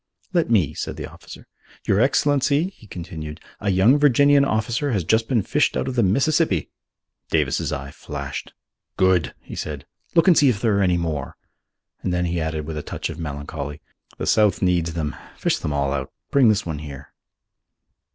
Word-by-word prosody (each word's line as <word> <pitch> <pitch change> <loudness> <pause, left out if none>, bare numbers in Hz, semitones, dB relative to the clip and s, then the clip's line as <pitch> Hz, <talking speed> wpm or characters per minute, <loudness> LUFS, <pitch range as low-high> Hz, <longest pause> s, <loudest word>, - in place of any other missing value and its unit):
"Let 170 -7 +2
me," 100 - +3
said - - -4
the - - -5
officer. - - -12 0.4
"Your 100 - +2
Excellency," 145 +5 +2
he 120 - -18
continued, 80 -4 -7 0.2
"a 100 - -1
young 100 +10 +5
Virginian 145 0 +5
officer 120 +3 0
has 100 -5 0
just 110 +6 +2
been 120 -6 +1
fished - - +1
out - - -1
of 130 - -2
the 120 - +3
Mississippi." 115 - +2 0.6
Davis's - - +1
eye 70 +1 -4
flashed. - - -6 0.5
"Good!" 95 -4 +2
he - - -11
said. 75 -3 -5 0.3
"Look 165 +2 +5
and 180 - +7
see 145 -4 +5
if 110 -5 0
there 110 -1 +2
are - - +2
many 90 -3 +3
more," 80 -6 -3 0.6
and 90 - -2
then 90 0 0
he 85 -1 -1
added 80 -1 -2
with 80 0 -5
a - - -2
touch - - -4
of 80 - -9
melancholy, 75 -1 -5 0.4
"The - - -3
South 105 -4 +3
needs 85 -3 +1
them: 75 -2 -2 0.2
fish - - 0
them 75 - -3
all 70 -1 0
out. 65 -2 -3 0.2
Bring 135 -5 +5
this 105 -1 +1
one 80 -3 -4
here." 70 -2 -9
95 Hz, 185 wpm, -22 LUFS, 80-125 Hz, 0.6 s, and